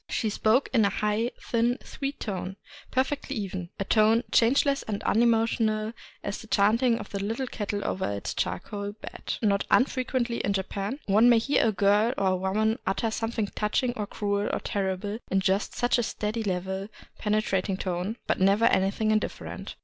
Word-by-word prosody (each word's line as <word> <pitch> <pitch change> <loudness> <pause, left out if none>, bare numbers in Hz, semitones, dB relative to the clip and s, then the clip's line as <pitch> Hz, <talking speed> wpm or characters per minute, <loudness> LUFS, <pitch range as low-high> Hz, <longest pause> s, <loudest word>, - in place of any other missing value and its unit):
She 220 - -1
spoke 220 +6 +2
in 230 -4 +5
a 200 - +4
high 210 +3 0
thin 240 +1 +1
sweet 275 0 -5
tone, 190 -2 -4 0.3
perfectly 275 +2 -1
even, 190 -5 -4
— - - -42
a 195 - -1
tone 220 +3 +4
changeless 275 +4 +3
and 205 -2 -4
unemotional 225 -1 +2 0.3
as 200 - -3
the 225 - -11
chanting 230 +4 +3
of 210 -3 -8
the 200 -1 -3
little 225 +6 -2
ket 210 -4 -5
tle 205 -1 -2
over 190 - -1
its 100 0 -4
charcoal 205 0 -3
bed. 215 - -6
Not 200 -2 +2
unfrequently 255 -2 +1
in 200 - 0
Japan 195 +5 -3
one 215 +4 +5
may 240 - +6
hear 230 +1 +2
a - - +3
girl 205 +4 +3
or 195 - +1
a 185 - +2
woman 210 +4 0
utter 220 +4 0
something 225 -1 -1
touching 230 +4 0
or 210 -3 -3
cruel 205 -1 -1
or - - -1
terrible 200 +2 -2
in 190 - +2
just 190 +1 0
such 245 0 +2
a - - +1
steady, 215 +1 -2
level, 190 0 -2 0.3
penetrating 210 -3 0
tone, 185 +4 -3
but - - 0
never 200 +4 +4
anything 200 +3 +2
indifferent. 215 0 -3
215 Hz, 180 wpm, -27 LUFS, 200-230 Hz, 0.3 s, may